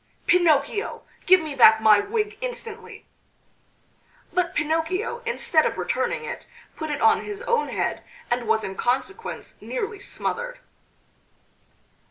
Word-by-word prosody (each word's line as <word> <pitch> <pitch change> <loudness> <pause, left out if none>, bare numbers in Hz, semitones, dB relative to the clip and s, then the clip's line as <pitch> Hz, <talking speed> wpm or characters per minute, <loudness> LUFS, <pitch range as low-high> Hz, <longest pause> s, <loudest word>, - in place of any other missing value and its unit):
"Pinocchio!... 345 +2 +2 0.2
Give 370 -1 +7
me 310 -2 -5
back 220 -5 +7
my 215 -1 +6
wig 425 - -2
instantly!" 475 -3 -7 1.3
But 355 -1 0
Pinocchio 325 +10 -1
instead 330 -9 +2
of - - -1
returning - - -1
it, - - -7 0.3
put 315 -2 -5
it 295 - -3
on 445 0 +4
his 410 -1 -6
own 470 -1 +1
head, - - -2 0.3
and 240 -1 0
was 220 0 +2
in 190 - -4
consequence 270 - -3
nearly 430 -4 -4
smothered. - - -4
365 Hz, 125 wpm, -24 LUFS, 290-450 Hz, 1.3 s, Give